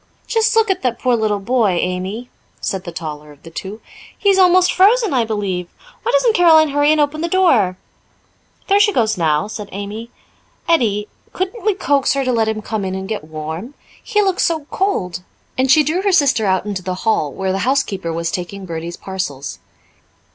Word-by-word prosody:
"Just 450 Hz, 0 st, +1 dB
look 445 Hz, -2 st, +4 dB
at 380 Hz, -, -2 dB
that 245 Hz, -3 st, -1 dB
poor 250 Hz, 0 st, +1 dB
little 215 Hz, -2 st, 0 dB
boy, 225 Hz, -2 st, +1 dB
Amy," 190 Hz, +7 st, -3 dB, 0.3 s
said 190 Hz, -1 st, -3 dB
the 175 Hz, -, -5 dB
taller 150 Hz, -2 st, -7 dB
of 145 Hz, -, -19 dB
the 165 Hz, -, -11 dB
two. 200 Hz, +6 st, -7 dB, 0.4 s
"He 405 Hz, -, +2 dB
is 385 Hz, -1 st, +4 dB
almost 365 Hz, 0 st, +5 dB
frozen, 425 Hz, -, +4 dB
I 245 Hz, -3 st, +2 dB
believe. 200 Hz, -5 st, -2 dB, 0.3 s
Why 475 Hz, -, -1 dB
doesn't -, -, +3 dB
Caroline 320 Hz, -5 st, +5 dB
hurry 290 Hz, +1 st, +3 dB
and 310 Hz, -, +2 dB
open 295 Hz, +1 st, 0 dB
the 340 Hz, -, 0 dB
door?" 270 Hz, -, +3 dB, 0.9 s
"There 400 Hz, +1 st, +4 dB
she 415 Hz, 0 st, +4 dB
goes 220 Hz, -, +1 dB
now," 155 Hz, -4 st, +1 dB
said 210 Hz, -1 st, -7 dB
Amy. 205 Hz, +4 st, -6 dB, 0.6 s
"Edie, 215 Hz, -11 st, +2 dB, 0.3 s
couldn't 375 Hz, +5 st, -4 dB
we 425 Hz, -2 st, +2 dB
coax 285 Hz, -7 st, +1 dB
her 275 Hz, -1 st, -1 dB
to 255 Hz, -, +1 dB
let 225 Hz, -2 st, +1 dB
him 215 Hz, -1 st, -2 dB
come 215 Hz, -2 st, -3 dB
in 190 Hz, 0 st, -3 dB
and 190 Hz, 0 st, -5 dB
get 210 Hz, -6 st, -4 dB
warm? 160 Hz, -, -6 dB, 0.3 s
He 420 Hz, -2 st, +1 dB
looks 385 Hz, -2 st, +1 dB
so 320 Hz, -3 st, 0 dB
cold." 185 Hz, -, -1 dB, 0.3 s
And 260 Hz, +1 st, +1 dB
she 300 Hz, +4 st, +6 dB
drew 315 Hz, +6 st, 0 dB
her 400 Hz, 0 st, +1 dB
sister 270 Hz, -, +3 dB
out 190 Hz, 0 st, +1 dB
into 200 Hz, -3 st, -3 dB
the 185 Hz, 0 st, -3 dB
hall, 155 Hz, -10 st, +1 dB
where 190 Hz, +5 st, -2 dB
the 190 Hz, -, -1 dB
housekeeper 205 Hz, -9 st, 0 dB
was 165 Hz, 0 st, -2 dB
taking 190 Hz, +2 st, -5 dB
Bertie's 170 Hz, 0 st, -6 dB
parcels. 145 Hz, -, -5 dB
225 Hz, 200 wpm, -18 LUFS, -, 0.9 s, she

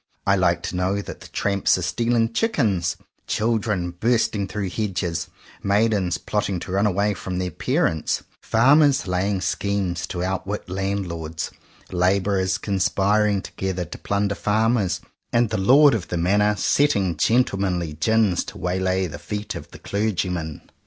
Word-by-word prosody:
I 100 Hz, -, +4 dB
like 85 Hz, -2 st, +1 dB
to -, -, -4 dB
know 95 Hz, +2 st, 0 dB
that 100 Hz, -, -9 dB
tramps 100 Hz, -1 st, +1 dB
are 90 Hz, -, -3 dB
stealing 115 Hz, +3 st, +1 dB
chickens, 110 Hz, -, +1 dB, 0.3 s
children 105 Hz, -5 st, 0 dB
bursting 105 Hz, +1 st, +1 dB
through 100 Hz, -2 st, -3 dB
hedges, 95 Hz, -6 st, -2 dB, 0.3 s
maidens 100 Hz, -3 st, +1 dB
plotting 100 Hz, -3 st, -2 dB
to -, -, -6 dB
run 100 Hz, +3 st, +2 dB
away 100 Hz, +1 st, +1 dB
from 90 Hz, 0 st, -5 dB
their 90 Hz, -1 st, -2 dB
parents, 80 Hz, 0 st, 0 dB, 0.2 s
farmers 140 Hz, +4 st, +4 dB
laying 95 Hz, +2 st, 0 dB
schemes 95 Hz, -2 st, -1 dB
to 90 Hz, -1 st, -3 dB
outwit 95 Hz, +2 st, -3 dB
landlords, 90 Hz, -4 st, -3 dB, 0.4 s
labourers 95 Hz, +1 st, +1 dB
conspiring 100 Hz, +1 st, +1 dB
together 95 Hz, -2 st, -3 dB
to -, -, -9 dB
plunder 100 Hz, 0 st, 0 dB
farmers, 110 Hz, 0 st, +1 dB, 0.3 s
and 120 Hz, -1 st, +2 dB
the 110 Hz, -, 0 dB
Lord 135 Hz, +8 st, +6 dB
of 110 Hz, -6 st, -2 dB
the 90 Hz, -, -2 dB
Manor 105 Hz, +5 st, +2 dB
setting 100 Hz, -, +2 dB
gentlemanly 95 Hz, -5 st, +1 dB
gins 100 Hz, +3 st, +2 dB
to -, -, -9 dB
waylay 95 Hz, +1 st, 0 dB
the 75 Hz, -4 st, -7 dB
feet 105 Hz, +6 st, -4 dB
of -, -, -8 dB
the -, -, -12 dB
clergyman. 90 Hz, -7 st, -2 dB
100 Hz, 140 wpm, -23 LUFS, 90-105 Hz, 0.4 s, Lord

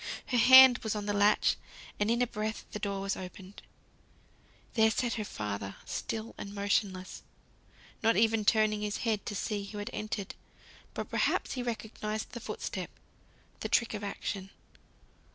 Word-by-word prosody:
Her 250 Hz, -, 0 dB
hand 260 Hz, +1 st, +9 dB
was 220 Hz, -1 st, -2 dB
on 210 Hz, -1 st, -3 dB
the 205 Hz, -, -1 dB
latch, 205 Hz, +1 st, +3 dB, 0.4 s
and 205 Hz, +1 st, +1 dB
in 235 Hz, +2 st, +3 dB
a -, -, +3 dB
breath 215 Hz, -1 st, -4 dB
the 210 Hz, -, -5 dB
door 200 Hz, -2 st, -2 dB
was 195 Hz, 0 st, -1 dB
opened. 185 Hz, +1 st, -9 dB, 1.1 s
There 220 Hz, -1 st, +5 dB
sat 235 Hz, +2 st, 0 dB
her 220 Hz, -, -2 dB
father, 100 Hz, -, -5 dB
still 225 Hz, 0 st, -4 dB
and 200 Hz, 0 st, -7 dB
motionless 200 Hz, -2 st, -1 dB, 0.8 s
not 225 Hz, 0 st, +3 dB
even 225 Hz, 0 st, +3 dB
turning 215 Hz, 0 st, +3 dB
his 210 Hz, -1 st, -2 dB
head 215 Hz, -3 st, 0 dB
to 205 Hz, -, -3 dB
see 205 Hz, 0 st, -2 dB
who 210 Hz, +1 st, -8 dB
had 205 Hz, 0 st, -5 dB
entered; 210 Hz, -2 st, -4 dB, 0.6 s
but -, -, -5 dB
perhaps -, -, +1 dB
he 255 Hz, -, -3 dB
recognised 220 Hz, -2 st, -4 dB
the 240 Hz, -, -6 dB
foot -, -, -6 dB
step, -, -, -4 dB, 0.7 s
the -, -, -4 dB
trick 235 Hz, -, +2 dB
of 210 Hz, -1 st, -5 dB
action. 195 Hz, -1 st, -4 dB
210 Hz, 165 wpm, -31 LUFS, 200-225 Hz, 1.1 s, hand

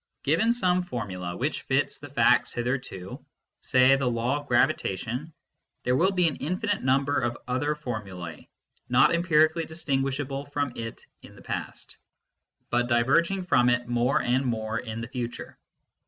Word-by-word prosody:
Given 225 Hz, +1 st, +3 dB
some 185 Hz, -7 st, +2 dB
formula 95 Hz, -, -5 dB
which -, -, -2 dB
fits -, -, 0 dB
the -, -, -10 dB
facts -, -, +3 dB
hitherto 120 Hz, -7 st, -4 dB, 0.4 s
say 130 Hz, +1 st, +5 dB
the 135 Hz, -2 st, 0 dB
law 120 Hz, +4 st, 0 dB
of 145 Hz, -, -13 dB
gravitation 120 Hz, -, 0 dB, 0.5 s
there 125 Hz, -, +2 dB
will 175 Hz, +8 st, +3 dB
be 180 Hz, -3 st, +3 dB
an 155 Hz, -, -2 dB
infinite 200 Hz, +5 st, -2 dB
number 135 Hz, +2 st, +2 dB
of 120 Hz, -1 st, -2 dB
other 140 Hz, +4 st, 0 dB
formulae, 95 Hz, -, -7 dB, 0.4 s
not -, -, +5 dB
empirically 165 Hz, -1 st, +3 dB
dis 160 Hz, +1 st, -8 dB
tinguishable 135 Hz, 0 st, -2 dB
from 145 Hz, -3 st, -1 dB
it 115 Hz, 0 st, -7 dB, 0.2 s
in -, -, -14 dB
the -, -, -15 dB
past, -, -, -6 dB, 0.7 s
but 120 Hz, 0 st, +2 dB
diverging 145 Hz, +11 st, +2 dB
from 125 Hz, -8 st, +3 dB
it 125 Hz, 0 st, +1 dB
more 120 Hz, +2 st, +2 dB
and 125 Hz, +3 st, +1 dB
more 115 Hz, -2 st, -2 dB
in 115 Hz, -2 st, -6 dB
the 115 Hz, -, -5 dB
future. 120 Hz, -1 st, -6 dB
130 Hz, 155 wpm, -27 LUFS, 120-150 Hz, 0.7 s, say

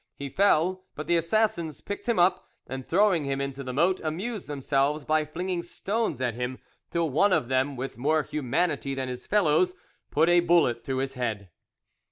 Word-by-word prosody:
He 140 Hz, 0 st, -6 dB
fell, 185 Hz, +2 st, +2 dB
but 150 Hz, -, -5 dB
the 175 Hz, -, +2 dB
assassins 170 Hz, -2 st, 0 dB
picked 205 Hz, +4 st, -6 dB
him 235 Hz, -, +2 dB
up, 180 Hz, +1 st, +3 dB, 0.2 s
and 130 Hz, 0 st, -6 dB
throwing 190 Hz, -3 st, +3 dB
him 135 Hz, 0 st, -1 dB
into 140 Hz, 0 st, -4 dB
the 130 Hz, -, -4 dB
moat, 170 Hz, +8 st, +2 dB
amused 190 Hz, +7 st, -4 dB
themselves 140 Hz, +1 st, 0 dB
by 155 Hz, 0 st, +2 dB
flinging 175 Hz, +3 st, -3 dB
stones 195 Hz, -, -2 dB
at 125 Hz, -3 st, 0 dB
him, 125 Hz, +2 st, -4 dB, 0.3 s
till 170 Hz, -3 st, 0 dB
one 195 Hz, +9 st, +3 dB
of 125 Hz, -9 st, +1 dB
them, 130 Hz, +2 st, +1 dB
with 130 Hz, -1 st, -6 dB
more 155 Hz, +4 st, +2 dB
humanity 140 Hz, 0 st, -1 dB
than 130 Hz, -1 st, -3 dB
his 125 Hz, 0 st, -7 dB
fellows, 180 Hz, -2 st, +3 dB, 0.3 s
put 160 Hz, +3 st, +3 dB
a 175 Hz, 0 st, +6 dB
bullet 170 Hz, -9 st, +3 dB
through 135 Hz, -1 st, -2 dB
his 135 Hz, -, -10 dB
head. 110 Hz, -7 st, -3 dB
155 Hz, 185 wpm, -27 LUFS, 135-180 Hz, 0.3 s, a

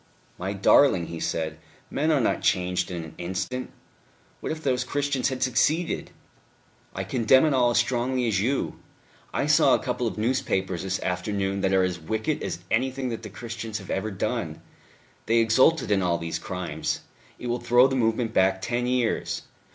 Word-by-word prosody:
"My 95 Hz, +2 st, -2 dB
darling," 95 Hz, -1 st, +4 dB
he 85 Hz, 0 st, -6 dB
said, 80 Hz, -1 st, -2 dB, 0.3 s
"men 155 Hz, +3 st, 0 dB
are 150 Hz, -, +3 dB
not 120 Hz, -, +1 dB
changed 90 Hz, 0 st, +1 dB
in 85 Hz, -2 st, -4 dB
an 80 Hz, -1 st, -10 dB
instant. 95 Hz, +8 st, -3 dB, 0.7 s
What -, -, -4 dB
if 155 Hz, 0 st, -5 dB
those 125 Hz, -2 st, +1 dB
Christians 140 Hz, 0 st, 0 dB
had 130 Hz, -1 st, -2 dB
succeeded!... 150 Hz, +7 st, +1 dB, 0.9 s
I 95 Hz, -, -2 dB
condemn 120 Hz, +6 st, +4 dB
it 155 Hz, -, +2 dB
all 125 Hz, -2 st, +4 dB
as 120 Hz, -, +1 dB
strongly 125 Hz, +1 st, +1 dB
as 100 Hz, -4 st, +1 dB
you. 130 Hz, +6 st, -1 dB, 0.5 s
I -, -, 0 dB
saw -, -, +5 dB
a -, -, -3 dB
couple -, -, -1 dB
of -, -, -4 dB
newspapers 95 Hz, -6 st, 0 dB
this 95 Hz, 0 st, -2 dB
afternoon 95 Hz, +2 st, -1 dB
that 95 Hz, -, +1 dB
are 95 Hz, -1 st, +4 dB
as 90 Hz, -2 st, -1 dB
wicked 110 Hz, -, -2 dB
as 85 Hz, -, -4 dB
anything 130 Hz, +2 st, 0 dB
that 115 Hz, -2 st, -4 dB
the 110 Hz, -, -8 dB
Christians 115 Hz, 0 st, -6 dB
have 95 Hz, -3 st, -8 dB
ever 95 Hz, +3 st, -1 dB
done. 95 Hz, -, -3 dB, 0.7 s
They 115 Hz, +1 st, +3 dB
exulted 120 Hz, +6 st, +4 dB
in 100 Hz, -1 st, +3 dB
all 85 Hz, -2 st, +1 dB
these 85 Hz, -1 st, -4 dB
crimes. 90 Hz, -3 st, -3 dB, 0.4 s
It -, -, -9 dB
will 120 Hz, 0 st, -1 dB
throw 120 Hz, +2 st, +5 dB
the 135 Hz, 0 st, +1 dB
movement 115 Hz, -1 st, +1 dB
back 95 Hz, -1 st, +3 dB
ten 120 Hz, +5 st, -1 dB
years.... 125 Hz, -2 st, 0 dB
110 Hz, 180 wpm, -26 LUFS, 95-125 Hz, 0.9 s, saw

